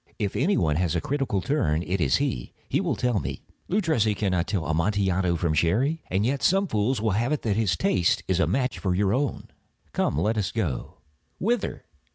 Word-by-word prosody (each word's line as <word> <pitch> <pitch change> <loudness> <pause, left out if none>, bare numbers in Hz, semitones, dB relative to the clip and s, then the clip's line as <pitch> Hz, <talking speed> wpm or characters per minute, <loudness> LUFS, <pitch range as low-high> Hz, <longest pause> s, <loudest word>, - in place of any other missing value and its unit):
If 100 -3 -2
any 180 +10 +2
one 75 -2 +1
has 90 -1 0
a - - +2
critical 130 - -1
turn, 85 - 0
it 90 +1 -2
is 70 -5 +3
he. - - -2
He - - +1
will - - 0
tell 125 -4 +1
me—" - - -5 0.3
"Luchesi 160 - +2
cannot 95 -4 0
tell 95 -7 -1
Amontillado 90 +2 +1
from 85 -1 0
Sherry." 120 - +1
"And 95 +3 +1
yet 135 +3 0
some 195 +2 +3
fools 110 - 0
will 110 0 +1
have 115 +7 0
it 150 - -1
that 105 -3 +1
his 100 -6 +1
taste 90 0 +2
is 95 -1 +1
a 85 - +3
match 125 +8 0
for 95 -2 0
your 100 +1 +2
own." 135 +1 -2 0.4
"Come, - - 0
let 105 +7 +1
us 95 - -1
go." 90 - -3 0.4
"Whither?" 230 +2 -1
100 Hz, 200 wpm, -26 LUFS, 90-130 Hz, 0.4 s, is